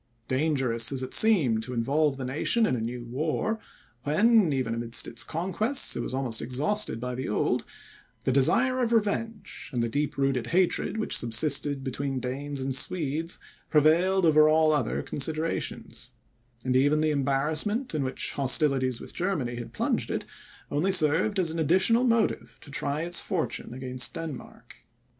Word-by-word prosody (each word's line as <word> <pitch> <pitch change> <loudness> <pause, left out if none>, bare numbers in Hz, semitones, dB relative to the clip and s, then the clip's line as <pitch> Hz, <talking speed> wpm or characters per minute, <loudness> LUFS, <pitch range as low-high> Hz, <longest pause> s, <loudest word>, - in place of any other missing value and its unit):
Dangerous 130 -5 +1
as 130 -1 0
it 130 - -6
seemed, 155 - +5
to 125 +2 -5
involve 140 +4 +1
the 130 - -5
nation 155 - +1
in 130 - 0
a 115 - -3
new 120 +1 -5
war, 155 - -2 0.4
when, 205 - +3
even 130 -4 -1
amidst 115 0 -1
its 115 - 0
conquests, 190 - 0
it - - -3
was - - -3
almost 130 -4 -1
exhausted 140 - -1
by 125 +1 -4
the 130 +2 -4
old, 105 - 0 0.6
the - - +2
desire 255 - +3
of 240 -2 0
revenge, 225 0 -2
and 120 -3 -1
the - - 0
deep 145 +6 -2
rooted 135 -3 0
hatred 185 +3 +1
which 220 - -2
subsisted 140 +3 +1
between 135 0 -3
Danes 135 +3 -4
and 135 0 -1
Swedes, 160 +2 -1 0.3
prevailed 170 +5 +3
over 155 -1 +5
all 155 0 +4
other 130 -6 -1
considerations; 155 +3 -2 0.6
and 130 0 0
even 145 +4 +3
the 155 0 +2
embarrassment 150 - 0
in 150 -3 -1
which 130 0 -2
hostilities 135 -2 +2
with - - -10
Germany 155 -11 -2
had 120 - -7
plunged - - -1
it, - - -3 0.5
only 155 +7 +1
served 180 +4 +3
as 175 -4 +1
an 165 - -4
additional 190 - +3
motive 230 -3 0
to 145 - -13
try 140 +1 -2
its 175 0 0
fortune 175 -9 -3
against 125 0 -3
Denmark. 160 -5 -8
145 Hz, 160 wpm, -27 LUFS, 130-175 Hz, 0.6 s, seemed